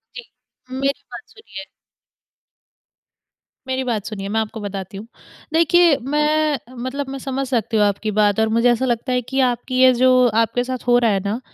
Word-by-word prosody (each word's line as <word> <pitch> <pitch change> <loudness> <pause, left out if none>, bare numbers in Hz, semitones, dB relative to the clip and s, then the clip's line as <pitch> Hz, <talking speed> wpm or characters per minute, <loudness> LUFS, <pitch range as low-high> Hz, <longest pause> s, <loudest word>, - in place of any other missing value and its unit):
जी, 485 - -8 0.5
मेरी 275 +2 -2
बात - - -8
सुनिए 440 -9 -11 2.0
मेरी 260 0 -2
बात 225 -5 -3
सुनिए, 195 -3 -6
मैं 220 +2 0
आपको 220 +1 -6
बताती 195 -1 -6
हूँ। 210 +3 -9 0.5
देखिए 335 -1 +4
मैं 300 +2 0 0.3
मतलब 275 +1 -4
मैं 270 0 -6
समझ 270 0 -4
सकती 230 -3 -1
हूँ 210 - +4
आपकी 205 +2 -1
बात 205 0 +3
और 220 - +2
मुझे 240 +1 +4
ऐसा 240 +2 0
लगता 240 +1 -2
है 250 - +1
कि 265 +3 -4
आपकी 245 +1 -5
ये 260 0 +7
जो 255 0 +4
आपके 230 +2 +1
साथ 255 -1 -6
हो 245 - +5
रहा 235 -2 +2
है 195 - +1
ना, 210 +4 -2
250 Hz, 180 wpm, -20 LUFS, 220-270 Hz, 2.0 s, ये